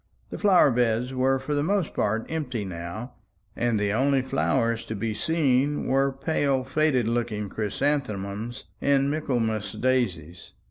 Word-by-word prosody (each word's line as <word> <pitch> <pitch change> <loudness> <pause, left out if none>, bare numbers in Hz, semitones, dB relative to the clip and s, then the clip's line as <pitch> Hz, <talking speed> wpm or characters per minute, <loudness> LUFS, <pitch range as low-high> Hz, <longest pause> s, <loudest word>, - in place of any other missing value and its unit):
The - - -5
flower 185 -8 +5
beds 120 +1 +1
were 130 +1 +2
for 130 +3 -4
the 145 - +1
most 190 +1 0
part 110 +2 0
empty 130 -9 -3
now, 90 +7 -6 0.4
and 115 -3 +1
the 105 0 0
only 135 +2 +2
flowers 125 -3 0
to 110 - -5
be 110 +2 -2
seen 145 0 +1
were 135 +1 +2
pale 135 -1 0
faded 135 -3 +1
looking 115 -3 -1
chrysanthemums 110 -1 -2 0.2
and 140 0 +2
Michaelmas 120 -8 -1
daises. 90 -10 -1
125 Hz, 140 wpm, -26 LUFS, 110-140 Hz, 0.4 s, flower